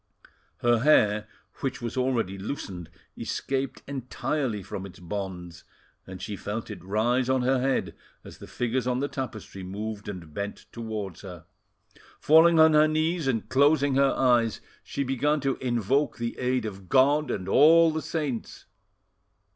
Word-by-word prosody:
Her 120 -1 +3
hair, 105 -6 +3 0.3
which 135 - -3
was 120 -1 -5
already 125 -7 0
loosened, 95 - -6 0.3
escaped 135 0 -3
entirely 130 -3 -3
from 95 - -6
its 90 - -14
bonds, 90 -2 -6 0.4
and 95 -1 -8
she 100 +3 -5
felt 105 +4 -5
it 105 - -9
rise 120 +6 +1
on 130 -1 +2
her 130 0 +2
head 135 0 0 0.3
as - - -12
the - - -10
figures 125 +1 -2
on 125 -1 +1
the 140 - 0
tapestry 120 -8 -6
moved 105 +3 -6
and 85 -6 -8
bent 100 +3 -5
towards 110 -6 -6
her. 90 -4 -10 0.7
Falling 160 +2 +6
on 160 0 +7
her 150 0 +6
knees 155 0 0
and 115 -5 -1
closing 140 +2 +3
her 135 0 +3
eyes, 120 -4 +2 0.2
she 140 - -3
began 140 +3 +1
to 135 -1 0
invoke 125 +3 0
the 115 0 -3
aid 125 -1 0
of 95 -3 -8
God 145 +3 +4
and 95 -1 -3
all 160 +8 +6
the 160 0 -3
saints. 145 -9 -4
125 Hz, 155 wpm, -26 LUFS, 105-140 Hz, 0.7 s, on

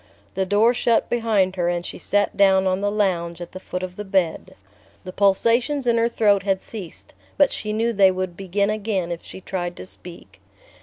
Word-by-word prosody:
The 190 -1 -1
door 210 +5 +4
shut 235 -1 +1
behind 210 -6 +1
her 175 -1 +1
and 175 0 -2
she - - -7
sat 205 0 0
down 190 -1 +4
on 185 +1 0
the 205 - +1
lounge 175 -5 -1
at 175 - -8
the 185 - -8
foot 180 -1 -5
of 185 0 -6
the 210 - -4
bed. 190 -5 -1 0.5
The 185 - -8
pulsations 235 +8 +2
in 235 -1 +2
her 230 +1 +2
throat 205 -4 +3
had 195 -1 0
ceased, 195 -6 -9 0.2
but 285 -2 +4
she 215 - -4
knew 230 +2 0
they 195 -2 +5
would 185 -1 -3
begin 195 +2 -1
again 205 -5 -2
if 170 - -5
she 190 - -10
tried 175 -2 -4
to - - -9
speak. 170 - -12
195 Hz, 205 wpm, -22 LUFS, 185-215 Hz, 0.5 s, they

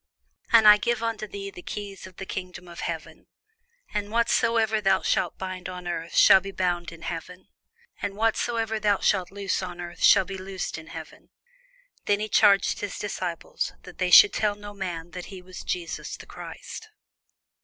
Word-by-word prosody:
And 225 -2 +7
I - - +12
will 210 - +5
give 235 +2 0
unto 225 -2 -2
thee 200 -1 -7
the 180 - -11
keys 200 0 -7
of 185 - -16
the 190 - -7
kingdom 180 -1 -7
of 170 -1 -10
heaven: 165 -2 -6 0.7
and 205 -1 -2
whatsoever 225 -1 +2
thou 195 -1 +3
shalt - - 0
bind 185 -1 -5
on 180 -1 -7
earth 170 -1 -4
shall 190 - +8
be 195 - -7
bound 175 -3 -1
in 165 -1 -12
heaven: 175 +2 -7 0.5
and 200 -1 -3
whatsoever 225 0 0
thou 205 -2 +2
shalt 185 -3 +2
loose 200 -1 -2
on 180 -1 -6
earth 175 0 -8
shall - - +6
be 195 0 -6
loosed 190 -3 -5
in 160 - -13
heaven. - - -10 0.8
Then 205 +1 +1
charged 200 -3 +4
he 205 - -2
his - - -8
disciples 180 -4 -4
that 180 - -13
they 185 -1 +1
should 200 +3 +9
tell 210 -1 +1
no 205 0 -10
man 175 -4 -5
that 180 0 -7
he 190 -2 -9
was 180 0 -10
Jesus 175 -2 -4
the - - -12
Christ. - - -9
190 Hz, 185 wpm, -26 LUFS, 180-205 Hz, 0.8 s, I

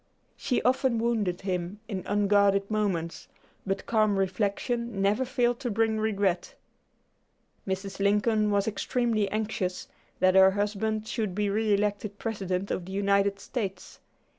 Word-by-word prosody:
She 250 - -1
often 260 -1 +2
wounded 225 -6 0
him 185 0 -3
in 195 -4 -4
unguarded 200 0 +3
moments, 190 -6 -2 0.4
but 195 0 -2
calm 215 -3 +2
reflection 205 +4 -1
never 200 +6 +2
failed 245 -2 0
to 245 - -3
bring 220 0 +1
regret. 200 -4 0 1.1
Mrs. 195 +1 -4
Lincoln 210 +2 +2
was 200 0 +1
extremely 220 -1 0
anxious 210 -4 -2 0.3
that 185 0 +4
her 190 0 +7
husband 210 +2 -1
should 215 -6 -2
be 205 -1 0
re 215 +1 +1
elected 205 0 -2
President 195 -4 -3
of 175 - -2
the 190 - -9
United 200 0 +2
States. 195 -6 -5
205 Hz, 135 wpm, -28 LUFS, 195-220 Hz, 1.1 s, her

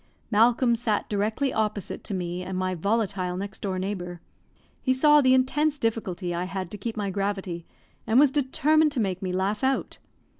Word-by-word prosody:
Malcolm 235 +3 +4
sat 225 -3 -1
directly 220 +6 0
opposite 210 -3 -2
to 200 - -4
me 180 0 -3
and 185 0 -4
my 185 0 -1
volatile 190 -1 -1
next 200 +2 -6
door 190 -2 -3
neighbour. 180 -2 -4 0.6
He 260 - +2
saw 295 +3 +5
the 260 -1 +5
intense 295 +4 +2
difficulty 200 -7 -2
I 175 +1 -2
had 185 -1 -5
to 210 - -6
keep 225 +2 -4
my 200 -2 -2
gravity, 195 -3 -3 0.4
and 230 +3 +4
was 285 -2 +6
determined 300 +3 +2
to - - -1
make 190 -4 -1
me 185 -1 -2
laugh 195 +4 -1
out. 265 0 0
205 Hz, 180 wpm, -26 LUFS, 185-255 Hz, 0.6 s, was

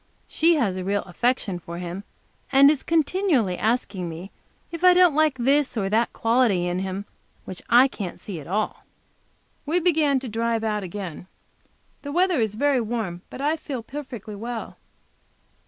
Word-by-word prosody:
She 335 +1 +3
has 210 -11 0
a 185 - -4
real 200 +2 -1
affection 195 -1 -1
for 170 0 -8
him, 180 +3 -6 0.5
and 275 +2 +7
is 300 - -2
continually 320 - +1
asking 200 -5 -1
me 170 +4 -8 0.4
if 335 +1 -7
I 365 -1 +7
don't 360 -3 +6
like 305 -2 +2
this 270 +1 +2
and 195 -2 -1
that 230 +2 +2
quality 225 -6 +2
in 175 +1 -1
him 190 +1 -4 0.4
which 185 - -8
I 245 +4 +7
can't 200 -9 -7
see 190 -6 -7
at 145 - -11
all. 210 +4 -2 0.8
We 325 +5 +1
begin 310 -6 +2
to 260 - -6
drive 230 0 -1
out 210 -1 -1
again. 185 -3 -7 0.7
The 285 - -6
weather 355 -1 +2
is, 215 -2 -1
very 280 +1 +2
warm, 215 -6 -3
but - - -8
I 300 +3 +1
feel 265 -6 -6
perfectly 250 -5 -8
well. 230 +2 -6
230 Hz, 170 wpm, -24 LUFS, 195-285 Hz, 0.8 s, and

